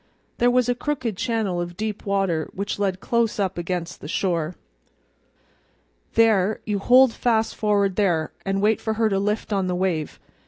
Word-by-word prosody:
There 245 - +4
was 250 -1 +2
a 245 - +2
crooked 245 -4 -3
channel 205 -5 -1
of 175 0 -6
deep 215 -1 -4
water 195 -6 0
which 200 +1 -3
led 190 -2 -1
close 235 -2 0
up 190 -2 0
against 175 0 -4
the - - -7
shore. 170 0 -1 1.6
"There, 215 -3 +3
you 210 -2 -1
hold 250 +3 +5
fast 225 -2 0
for'ard 200 -3 +1
there, 170 -7 +1
an' 195 0 -1
wait 215 +1 +2
for 220 - -1
her 220 0 +1
to 195 -1 +1
lift 210 +2 -1
on 195 -2 0
the 180 - -1
wave. 180 -4 -2
200 Hz, 170 wpm, -23 LUFS, 185-220 Hz, 1.6 s, hold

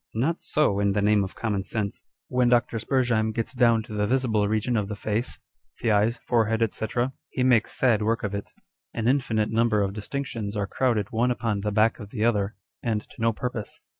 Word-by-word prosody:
Not 150 +10 0
so, 145 -10 +1
in 100 -1 +2
the 105 - +1
name 105 -1 +4
of 95 - -6
common 105 -4 -1
sense! 100 -1 -3 0.3
When 125 -1 +2
Dr. 120 -1 +2
Spurzheim 115 -3 +1
gets 115 +3 -3
down 120 -3 +3
to 110 -1 -10
the 105 -1 0
visible 115 -4 +1
region 110 +3 0
of 105 -3 0
the 105 - -4
face, 110 +3 -2 0.4
the 115 - +1
eyes, 105 +3 +3
forehead, 115 -2 +2
&c., 110 - -3 0.4
he 130 - -1
makes 125 -4 +3
sad 120 -5 +3
work 115 +2 0
of 100 -1 -2
it: 100 0 -5 0.4
an 115 0 -1
infinite 115 -5 +1
number 110 -2 +2
of 100 0 -2
distinctions 110 -1 -4
are 100 - 0
crowded 110 -2 0
one 120 +2 +2
upon 115 -4 -1
the 105 +1 -1
back 110 +2 +2
of 105 -3 -8
the 110 0 -1
other, 105 -2 +1 0.3
and 110 -3 0
to - - -12
no 115 0 +3
purpose. 115 -1 -5
110 Hz, 205 wpm, -26 LUFS, 105-120 Hz, 0.4 s, name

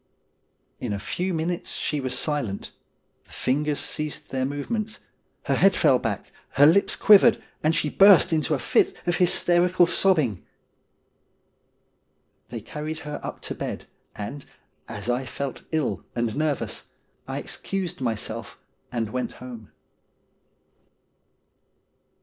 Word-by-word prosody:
' - - -46
In 105 - -2
a 100 - -3
few 180 - -2
minutes 170 +1 -2
she 150 - -1
was 130 -1 -1
silent, 135 -11 -2 0.5
the - - -22
fingers 145 +3 0
ceased 150 -1 -2
their 130 -1 0
movements, 210 - -3 0.4
her - - 0
head - - +4
fell - - +4
back, - - -4 0.2
her 145 - +6
lips 170 +6 +4
quivered, 205 -1 +6 0.2
and 155 +2 +2
she 155 - +1
burst 195 +2 +6
into 155 -1 +1
a - - -1
fit 120 - +2
of 175 -2 +1
hysterical 175 0 +3
sobbing. 155 - +2 2.1
They 115 -2 -6
carried 155 +6 -6
her 150 0 -5
up - - -7
to - - -4
bed, - - -5 0.3
and, 135 +7 -6 0.4
as - - -6
I 125 +2 0
felt 135 +1 -5
ill 155 -4 -1
and 120 -2 -1
nervous, 150 -2 -2 0.4
I - - -4
excused 180 -5 -4
myself 115 -4 -3 0.3
and 115 -3 -2
went 125 +1 -3
home. 120 -4 -10
150 Hz, 130 wpm, -25 LUFS, 125-170 Hz, 2.1 s, her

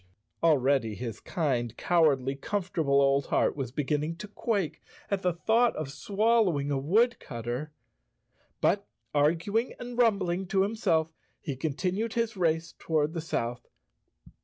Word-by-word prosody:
Already 135 -8 +3
his 115 -2 -5
kind, 120 -8 -1
cow¬ 170 -3 +4
ardly, 135 -2 +1
comfortable 160 -4 0
old 140 0 +3
heart - - +2
was 135 -4 -4
beginning 150 +3 -1
to 190 +5 -8
quake 205 -4 -2 0.3
at 200 -1 0
the 180 - +2
thought 225 +8 +2
of 150 -3 -4
swallowing 200 -7 +1
a 140 - +1
woodcutter. 150 - 0 0.9
But, 200 +2 +2 0.3
arguing 170 - +1
and 245 0 -6
rumbling 195 -5 +2
to 190 +1 +2
himself, 165 -7 0 0.3
he 140 -4 -4
continued 180 - -2
his 230 -1 -1
race 165 -2 0
toward 155 -1 0
the 165 - -3
south. 120 -6 -3
160 Hz, 135 wpm, -28 LUFS, 140-200 Hz, 0.9 s, cow¬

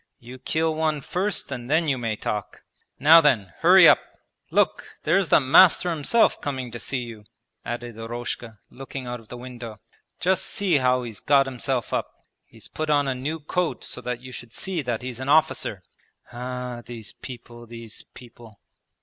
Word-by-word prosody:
You 125 +2 -12
kill 160 +4 0
one 155 -2 0
first, 190 +1 -1
and 125 -2 -6
then 160 +2 +2
you 140 - +2
may 115 -3 -2
talk. 105 -1 -5 0.3
Now 160 +5 +8
then, 110 - +2
hurry - - +8
up! - - +7 0.5
Look, - - 0
there's 180 +3 +2
the - - +6
master 175 +6 +5
himself 165 +9 +2
coming 130 -4 -4
to 120 - -6
see 125 +2 -3
you,' 115 -3 -10 0.4
added 120 -1 -6
Eroshka, 115 0 -5
looking 135 0 -8
out 120 0 -5
of 115 - -18
the 125 - -8
window. 120 -3 -9 0.4
'Just 185 +1 +1
see 190 -6 +1
how 125 -1 +2
he's 115 -4 -7
got 140 -1 +4
himself 130 -1 -3
up. - - -1 0.4
He's - - -14
put 155 0 -4
on 145 -2 +3
a 135 - +1
new 150 +5 -4
coat 175 +3 -2
so - - -6
that 125 -1 -4
you 130 0 -10
should 120 -1 -9
see 190 -4 -3
that 120 -3 -3
he's 125 -1 -6
an 130 +1 -4
officer. 150 - +2 0.5
Ah, 125 0 -5
these 115 -2 -8
people, 120 -2 -11
these 115 -1 -9
people!' 120 -3 -14
125 Hz, 175 wpm, -24 LUFS, 120-150 Hz, 0.5 s, Now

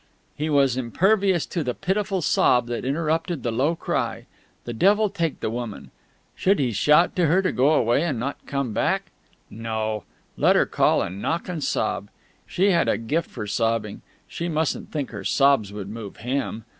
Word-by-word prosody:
He 155 +2 -2
was 135 -4 +3
impervious 190 - +2
to 170 - -3
the 125 -3 -2
pitiful 195 -1 -1
sob 125 -4 +3
that 120 0 -4
interrupted 160 +3 -1
the 120 - -1
low 140 +9 +1
cry. - - -2 0.4
The 120 - -4
devil 205 - +3
take 170 -6 -2
the - - -1
woman! 120 -3 -6 0.4
Should 195 +2 +2
he 130 -4 0
shout 150 - +3
to 175 -3 +3
her 185 +6 +3
to 185 - +1
go 140 +5 +3
away 120 +1 +2
and 145 -9 -1
not 140 +4 -5
come 140 -5 -2
back? - - 0 0.4
No: 110 -2 -3 0.3
let - - +4
her - - +4
call - - +2
and 95 +3 -6
knock 165 +1 -2
and 170 -5 -4
sob. - - -1 0.4
She 195 +3 +2
had 170 -2 +2
a - - +2
gift 150 +9 -2
for 110 -4 -6
sobbing; 110 0 -1 0.3
she 170 +1 -4
mustn't 155 -3 -1
think 145 -4 -3
her 100 -4 -7
sobs 135 -4 +3
would 100 -2 -6
move 105 -1 -8
him. 125 -3 -3
140 Hz, 180 wpm, -24 LUFS, 115-170 Hz, 0.4 s, let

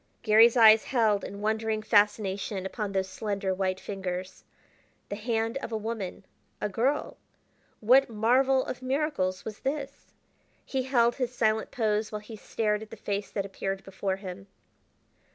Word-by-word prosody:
Garry's 225 +3 +6
eyes 220 -1 +7
held 220 -5 +2
in 200 +1 -7
wondering 220 0 -1
fascination 205 -2 +1
upon 205 +1 -3
those 190 -1 0
slender 200 -1 -2
white 185 0 -1
fingers. 185 -2 -5 0.7
The - - -3
hand 225 +2 -1
of 235 - -6
a 220 - -1
woman 215 -4 -5 0.3
a - - -1
girl! 255 +8 -1 0.6
what 255 +5 +5
marvel 255 +4 +3
of 255 - -6
miracles 255 - -1
was 215 -1 -6
this? 275 0 -4 0.5
He 265 - -1
held 240 -2 +2
his 250 -2 -2
silent 220 -1 +1
pose 215 -2 0
while 210 -1 -4
he 220 +1 -10
stared 210 0 -1
at 220 - -9
the - - -10
face 200 0 -3
that 200 -2 -3
appeared 195 0 -4
before 195 0 -3
him. 195 0 -9
215 Hz, 155 wpm, -28 LUFS, 195-235 Hz, 0.7 s, eyes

